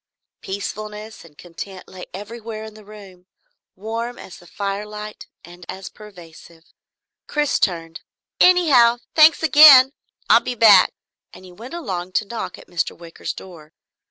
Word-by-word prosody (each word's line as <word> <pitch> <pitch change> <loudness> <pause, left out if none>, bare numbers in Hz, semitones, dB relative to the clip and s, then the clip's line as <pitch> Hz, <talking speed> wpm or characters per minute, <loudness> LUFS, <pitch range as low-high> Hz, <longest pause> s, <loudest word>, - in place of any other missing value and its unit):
Peacefulness 210 +2 -7
and 155 -3 -19
content 180 +2 -10
lay 185 -1 -11
everywhere 220 +2 -8
in 220 -1 -10
the 215 0 -15
room, 195 -3 -15 0.5
warm 230 +4 -5
as 185 - -12
the 175 - -18
firelight 210 +2 -6 0.2
and 175 +1 -15
as 190 0 -7
pervasive. 170 -5 -15 0.6
Chris 295 -1 -1
turned. 165 -3 -2 0.4
"Anyhow, 285 -10 +5 0.2
thanks 315 +1 +5
again. 280 -3 +8 0.4
I'll - - +6
be 250 - -5
back," 210 -5 +6 0.4
and 185 - -14
he 180 - -14
went 230 - -11
along 185 - -6
to 215 - 0
knock 230 +3 -7
at - - -15
Mr. 175 -2 -4
Wicker's 170 -1 -8
door. 160 -4 -13
210 Hz, 140 wpm, -20 LUFS, 180-235 Hz, 0.6 s, again